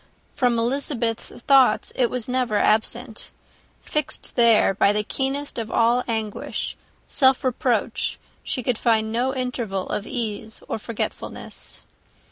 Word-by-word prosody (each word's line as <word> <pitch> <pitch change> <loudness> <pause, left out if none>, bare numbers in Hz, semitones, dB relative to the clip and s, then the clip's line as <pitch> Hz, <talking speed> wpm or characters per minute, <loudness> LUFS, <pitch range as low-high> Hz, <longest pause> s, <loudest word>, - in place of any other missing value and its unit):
From 245 -2 +2
Elizabeth's 235 -1 -1 0.2
thoughts 270 -2 +4
it 245 -2 +2
was 250 -3 -3
never 250 -4 0
absent. 220 +2 0 0.5
Fixed 300 -2 -2
there 230 -5 +5
by 200 +1 +4
the 210 0 0
keenest 270 +4 -2
of 225 -1 -4
all 240 +2 +3
anguish, 220 -3 -3 0.3
self 260 -2 +3
reproach, 240 -3 0 0.2
she 255 - -3
could 240 -1 0
find 220 -2 +2
no 250 +4 0
interval 240 -7 -2
of 210 - -3
ease 220 -3 -4
or - - -3
forgetfulness. 225 +1 -6
235 Hz, 125 wpm, -23 LUFS, 220-255 Hz, 0.5 s, there